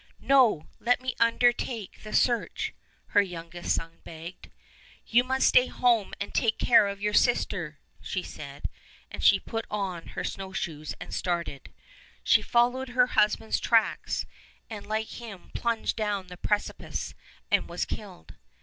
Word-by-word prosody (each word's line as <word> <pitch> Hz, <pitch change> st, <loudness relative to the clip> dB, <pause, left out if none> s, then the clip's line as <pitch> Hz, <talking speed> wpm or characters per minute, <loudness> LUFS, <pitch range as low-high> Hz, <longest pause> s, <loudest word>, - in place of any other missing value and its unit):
"No, 250 Hz, -, +4 dB
let 245 Hz, +1 st, +2 dB
me 255 Hz, 0 st, -3 dB
undertake 230 Hz, -2 st, +1 dB
the 215 Hz, -, -9 dB
search," 240 Hz, +1 st, +1 dB, 0.4 s
her 205 Hz, -, +5 dB
youngest 175 Hz, -2 st, -3 dB
son 165 Hz, 0 st, -6 dB
begged. 165 Hz, +2 st, -10 dB, 0.6 s
"You 240 Hz, +2 st, +4 dB
must 265 Hz, +1 st, +2 dB
stay 250 Hz, -, +6 dB
at -, -, -10 dB
home 235 Hz, -5 st, +2 dB
and 200 Hz, -, -5 dB
take 225 Hz, -1 st, +2 dB
care 225 Hz, -4 st, +5 dB
of 200 Hz, 0 st, -4 dB
your 210 Hz, 0 st, +1 dB
sister," 175 Hz, -, +1 dB, 0.2 s
she 185 Hz, -, -3 dB
said, 140 Hz, -1 st, -7 dB, 0.4 s
and -, -, -6 dB
she -, -, +6 dB
put 225 Hz, -1 st, -5 dB
on 190 Hz, -5 st, -3 dB
her -, -, -1 dB
snowshoes 180 Hz, -6 st, -4 dB
and -, -, -8 dB
started. 170 Hz, -6 st, -3 dB, 0.5 s
She -, -, +5 dB
followed 245 Hz, +2 st, +2 dB
her 250 Hz, 0 st, +4 dB
husband's 215 Hz, +1 st, +2 dB
tracks, 230 Hz, -2 st, +1 dB, 0.5 s
and 210 Hz, -2 st, -7 dB
like 220 Hz, +1 st, -1 dB
him 205 Hz, -6 st, -10 dB
plunged 235 Hz, -1 st, -1 dB
down 205 Hz, -4 st, -2 dB
the 180 Hz, -, -8 dB
precipice 205 Hz, +3 st, -2 dB, 0.4 s
and -, -, +2 dB
was -, -, -2 dB
killed. 80 Hz, -1 st, -8 dB
210 Hz, 150 wpm, -28 LUFS, 175-235 Hz, 0.6 s, stay